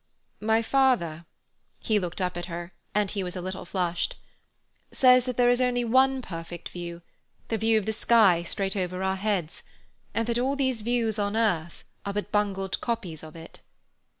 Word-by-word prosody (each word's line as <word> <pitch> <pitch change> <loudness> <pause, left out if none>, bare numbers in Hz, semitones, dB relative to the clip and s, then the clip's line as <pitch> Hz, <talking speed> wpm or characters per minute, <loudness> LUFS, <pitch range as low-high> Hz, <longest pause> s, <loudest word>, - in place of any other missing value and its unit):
"My 220 +2 +2
father"—he 215 - -1
looked 180 0 -4
up 180 -1 -1
at 175 0 -4
her 175 0 -6 0.2
(and 210 -2 +2
he 200 -2 -2
was 180 -1 -4
a - - -3
little 185 +1 -5
flushed)—"says 195 +7 0
that 250 -2 -3
there 245 -1 +5
is 245 +1 +2
only 245 -1 +2
one 260 +2 +3
perfect 170 -2 -7
view—the 175 +5 -8
view 225 0 +3
of 210 - -1
the 220 - -1
sky 215 -6 +5
straight 195 +3 -2
over 185 -1 -2
our 190 0 +1
heads, 190 -5 -2 0.5
and 230 - +1
that 235 +1 0
all 265 +3 +1
these 260 -5 0
views 225 -1 0
on 205 +1 0
earth 175 -7 0 0.2
are 200 - -3
but 205 0 -3
bungled 195 -2 0
copies 210 -10 -3
of 155 0 -11
it." 165 0 -11
205 Hz, 170 wpm, -27 LUFS, 175-235 Hz, 0.5 s, there